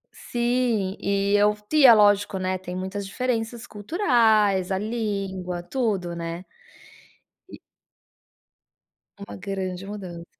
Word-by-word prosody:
Sim, 240 -5 -1
e 200 0 +1
eu 210 +1 +3 0.3
é 240 - +10
lógico, 205 -2 +3
né, 185 0 -1
tem 180 -1 -8
muitas 190 +2 -4
diferenças 230 +1 -3
culturais, 215 - +2
a 190 - 0
língua, 195 -5 -3
tudo, 200 -6 -2
né. 170 +1 -5 1.1
E - - -11 1.6
Uma 200 - -9
grande 190 -1 -5
mudança. 185 -5 -8
200 Hz, 105 wpm, -24 LUFS, 185-220 Hz, 1.6 s, é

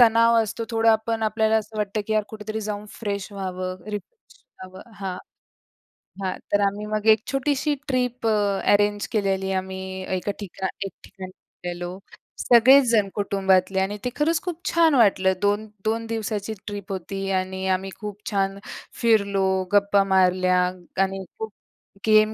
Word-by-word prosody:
तणाव 230 0 +6
असतो. 225 +2 -4
थोडा 225 0 +4
आपण 225 +1 -1
आपल्याला 220 0 +2
असं 215 0 -4
वाटतं 210 +1 -1
की 220 - -1
"यार, 215 0 +3
कुठेतरी 215 0 -5
जाऊन 210 -1 -4
फ्रेश 200 -2 -3
व्हावं, 185 -2 -4
रिफ्रेश 435 - -9 0.2
व्हावं." 190 +5 -13
हां, 190 -2 -3 1.1
हां. 185 -1 -1 0.2
तर 205 - +3
आम्ही 205 +2 -4
मग 215 0 -2
एक 215 - -18
छोटीशी 285 +2 0
ट्रिप 250 -2 -1
अ, 205 -3 +2
अरेंज 205 0 +2
केलेली 195 -3 0
आहे. 190 - -1
आम्ही 190 0 -5 0.2
एका 205 - -2
ठिकाण 190 -1 -4 0.2
एक 195 - -5
ठिकाणी 185 -1 -10 0.3
गेलेलो. 175 +1 -4 0.4
सगळेच 255 +3 +7
जण 215 -4 +3
कुटुंबातले 195 -2 +2
आणि 195 +2 -1
ते - - +1
खरंच 315 +2 +2
खूप 350 -3 -5
छान 330 -2 +4
वाटलं. 195 -5 +4
दोन 205 +1 +1 0.2
2 225 +1 0
दिवसाची 220 -1 -3
ट्रिप 205 -2 -6
होती 195 +1 -4
आणि 190 0 -4
आम्ही 190 +1 0
खूप 210 -1 -6
छान 195 -1 0 0.4
फिरलो, 200 -4 +2
गप्पा 200 0 +4
मारल्या 185 -1 +3 0.4
आणि 195 0 -3 0.2
खूप 220 -1 -4 0.5
गेम 215 0 +5
205 Hz, 155 wpm, -24 LUFS, 190-220 Hz, 1.1 s, सगळेच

